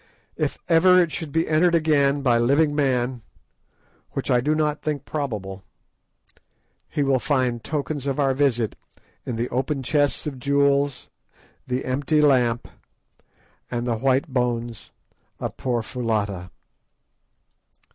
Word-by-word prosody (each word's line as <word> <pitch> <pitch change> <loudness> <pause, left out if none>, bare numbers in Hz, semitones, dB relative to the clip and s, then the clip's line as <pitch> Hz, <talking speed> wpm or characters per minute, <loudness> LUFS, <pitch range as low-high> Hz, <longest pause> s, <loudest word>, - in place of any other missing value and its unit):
If - - -2
ever 180 +2 +6
it 170 -3 +2
should 155 0 -5
be 165 +3 +1
entered 170 +3 +3
again 145 -3 +2
by 120 -3 +3
living 145 +5 +3
man, 130 -4 0 0.9
which - - -2
I 125 - +4
do 150 +4 +1
not 150 -1 0
think 145 -3 -3
probable, 105 -10 -4 1.3
he 145 - -1
will 135 -1 +2
find 125 -4 0
tokens 145 -2 -3
of 135 +1 -1
our 135 -2 +2
visit 125 -5 +1 0.5
in 125 - -2
the 115 +2 -1
open 135 +2 -2
chests 145 +1 +1
of 140 -4 -5
jewels, 140 0 +1 0.6
the 125 0 -2
empty 140 +4 +1
lamp, 125 -5 +3 1.0
and 120 -1 -3
the 120 -2 0
white 135 +5 +2
bones 120 -4 -2 0.5
of - - -4
poor 120 -3 -1
Foulata. 105 -7 -2
135 Hz, 130 wpm, -23 LUFS, 120-150 Hz, 1.3 s, ever